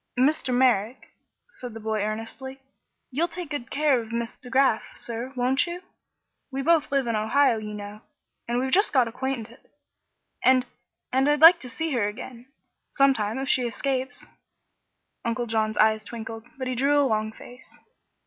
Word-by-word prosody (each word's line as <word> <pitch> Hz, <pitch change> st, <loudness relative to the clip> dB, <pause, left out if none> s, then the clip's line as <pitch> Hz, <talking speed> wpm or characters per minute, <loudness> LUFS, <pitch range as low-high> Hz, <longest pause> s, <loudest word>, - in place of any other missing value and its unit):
"Mr. 270 Hz, 0 st, +2 dB
Merrick," 245 Hz, -2 st, +1 dB, 0.4 s
said 250 Hz, -, -9 dB
the -, -, -6 dB
boy, 220 Hz, -1 st, -2 dB
earnestly, 225 Hz, +6 st, -5 dB, 0.5 s
"you'll 315 Hz, +7 st, +1 dB
take 345 Hz, -2 st, -7 dB
good 270 Hz, -5 st, -4 dB
care 285 Hz, -3 st, +2 dB
of 225 Hz, 0 st, -10 dB
Miss 235 Hz, 0 st, -3 dB
De 250 Hz, -, -13 dB
Graf, 260 Hz, -3 st, +3 dB
sir, 235 Hz, +2 st, -5 dB
won't 255 Hz, +5 st, +1 dB
you? 350 Hz, +2 st, -6 dB, 0.7 s
We 270 Hz, +1 st, -3 dB
both 325 Hz, -1 st, +3 dB
live 275 Hz, -2 st, +1 dB
in 230 Hz, -1 st, -1 dB
Ohio, 230 Hz, +3 st, +3 dB
you 210 Hz, -1 st, -6 dB
know, 205 Hz, +1 st, -8 dB, 0.5 s
and 240 Hz, +1 st, -1 dB
we've 260 Hz, +1 st, -1 dB
just 400 Hz, +1 st, +3 dB
got 255 Hz, -4 st, +4 dB
acquainted; 240 Hz, -1 st, -4 dB, 0.8 s
and 255 Hz, -1 st, +5 dB, 0.5 s
and 265 Hz, +2 st, +3 dB
I'd 295 Hz, 0 st, +2 dB
like 335 Hz, +2 st, +9 dB
to 250 Hz, -, -9 dB
see 320 Hz, +6 st, -3 dB
her 235 Hz, -6 st, +1 dB
again, 240 Hz, +3 st, -8 dB, 0.4 s
some 275 Hz, -1 st, +4 dB
time, 215 Hz, -1 st, -2 dB
if 270 Hz, 0 st, -3 dB
she 250 Hz, -2 st, +2 dB
escapes." 260 Hz, +2 st, -3 dB, 1.0 s
Uncle 235 Hz, +1 st, -1 dB
John's 220 Hz, -1 st, -1 dB
eyes 220 Hz, 0 st, +3 dB
twinkled, 225 Hz, +1 st, -8 dB
but 260 Hz, -, -4 dB
he 255 Hz, -, -1 dB
drew 280 Hz, +4 st, +2 dB
a 285 Hz, -, +4 dB
long 215 Hz, -3 st, 0 dB
face. 245 Hz, +3 st, -14 dB
250 Hz, 170 wpm, -25 LUFS, 225-275 Hz, 1.0 s, like